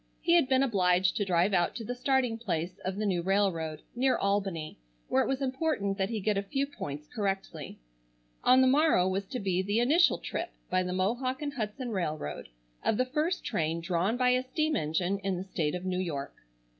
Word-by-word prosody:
He 340 - +2
had 335 -7 +4
been 260 0 +4
obliged 185 -6 +2
to 205 - 0
drive 180 +2 +2
out 175 -2 +2
to 235 - -5
the 245 - -3
starting 250 -2 +1
place 180 -4 -3
of 185 0 -3
the 215 +1 -2
new 185 -4 +1
railroad, 170 -5 0
near 260 +1 +2
Albany, 195 - -1 0.3
where 130 - +3
it - - 0
was 270 +1 -1
important 260 -8 -1
that 190 +1 +1
he 225 -2 -2
get 205 0 +1
a - - -1
few 270 +8 -1
points 150 - -7
correctly. 195 -8 -3 0.7
On 255 +1 +6
the 260 - +5
morrow 275 - +4
was 190 +1 -1
to 250 - -4
be 185 -2 0
the 205 +4 0
initial 305 +9 +4
trip, 345 +1 -4 0.2
by 185 0 +3
the 180 0 -2
Mohawk 245 +9 -1
and 285 -1 -3
Hudson 240 0 -4
Railroad, 155 - -3 0.3
of 215 - +1
the 255 - +2
first 305 +7 -1
train 160 +1 -1
drawn 175 +6 0
by 250 0 +3
a 250 0 +3
steam 310 +4 -1
engine 175 +5 0
in 195 -2 -2
the 180 - -4
state 170 -5 -2
of 180 +1 -5
New 185 -1 -1
York. 150 -7 -3
200 Hz, 205 wpm, -29 LUFS, 180-255 Hz, 0.7 s, On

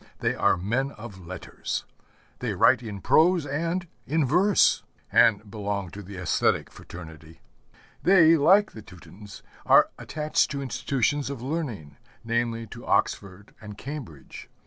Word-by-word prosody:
They - - 0
are - - +2
men 120 +10 -1
of 100 -6 -11
letters. 95 -1 -5 0.5
They - - -3
write - - +4
in 105 -5 -7
prose 170 - +3
and 165 +5 -2 0.2
in 155 +1 +1
verse, 180 +9 +3 0.3
and 110 -3 +3
belong 100 -4 -4
to 105 - -9
the 100 0 -10
æsthetic 90 -2 0
fraternity. 80 -2 -12 0.6
They, 170 -3 +6
like 190 +8 +4
the 110 - -10
Teutons, 95 -1 -13 0.2
are - - +5
attached 150 0 0
to 140 -1 -4
institutions 135 +1 -1
of 135 -4 -6
learning, 125 - -5 0.3
namely, 115 0 -1
to - - -11
Oxford 100 +1 -1
and 105 -1 -10
Cambridge. 125 - -9
115 Hz, 135 wpm, -26 LUFS, 95-150 Hz, 0.6 s, They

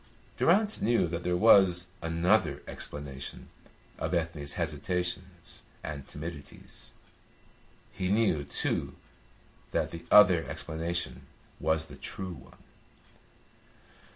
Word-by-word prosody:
Durrance 210 +5 +3
knew 115 -4 +3
that 85 0 -3
there 90 0 0
was 95 -4 +6 0.2
another 85 -1 +1
explanation 70 -2 -6 0.5
of 80 +2 -1
Ethne's 80 -4 -2
hesitations 85 +3 -3 0.2
and 70 -3 -6
timidities. 75 -1 -9 1.0
He 90 - -2
knew, 100 -8 +2
too, 70 - -2 0.7
that - - -1
the 85 0 -8
other 95 -5 +7
explanation 85 +2 -3 0.3
was 80 0 +1
the 75 - -12
true 95 -2 -3
one. - - -15
85 Hz, 95 wpm, -29 LUFS, 80-90 Hz, 1.0 s, other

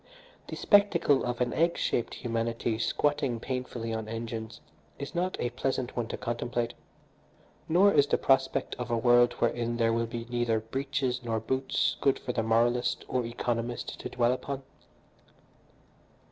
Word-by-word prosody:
The - - -5
spectacle 190 -9 +4
of 120 0 -2
an 120 -1 +1
egg 170 +1 +2
shaped 120 - -1
humanity 115 -1 -2
squatting 140 -1 0
painfully 125 -2 -4
on 110 -1 -3
engines 115 0 -5 0.4
is 140 +2 -6
not 180 +1 -1
a 120 - -1
pleasant 130 0 -2
one 120 -2 -1
to - - -5
contemplate, 120 0 -2 1.0
nor 190 +5 +5
is 145 -1 +5
the - - +2
prospect 135 0 +2
of 120 -1 -4
a 120 - +1
world 120 +1 +5
wherein 120 0 -1
there 115 -1 +2
will 115 0 0
be 115 0 -5
neither 120 -2 +1
breeches 130 +2 -2
nor 115 -2 -1
boots 130 +4 0
good 135 - +3
for 125 - -4
the 115 - 0
moralist 120 +2 +1
or 125 -1 0
economist 120 0 -3
to - - -5
dwell 120 -1 +2
upon. 135 +1 -5
120 Hz, 155 wpm, -29 LUFS, 115-135 Hz, 1.0 s, nor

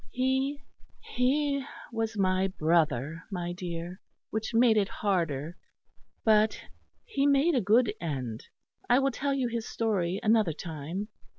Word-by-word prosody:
He 265 +2 0 0.4
he 280 +2 0 0.3
was 225 -1 -2
my 185 -1 +2
brother, 160 -4 +1
my 175 -3 -3
dear, 175 0 -6 0.3
which 220 0 -2
made 230 -1 +5
it 205 -2 +3
harder; 170 -6 -1 0.7
but 215 -1 +4 0.5
he 285 - +1
made 285 +4 +4
a 255 - +2
good 215 +2 +3
end. 130 -8 -4 0.4
I 245 - +6
will 275 0 +2
tell 275 +2 -1
you 260 -2 0
his 230 -1 -4
story 195 -5 0
another 215 -6 +3
time. 165 +6 -5
210 Hz, 130 wpm, -29 LUFS, 170-250 Hz, 0.7 s, I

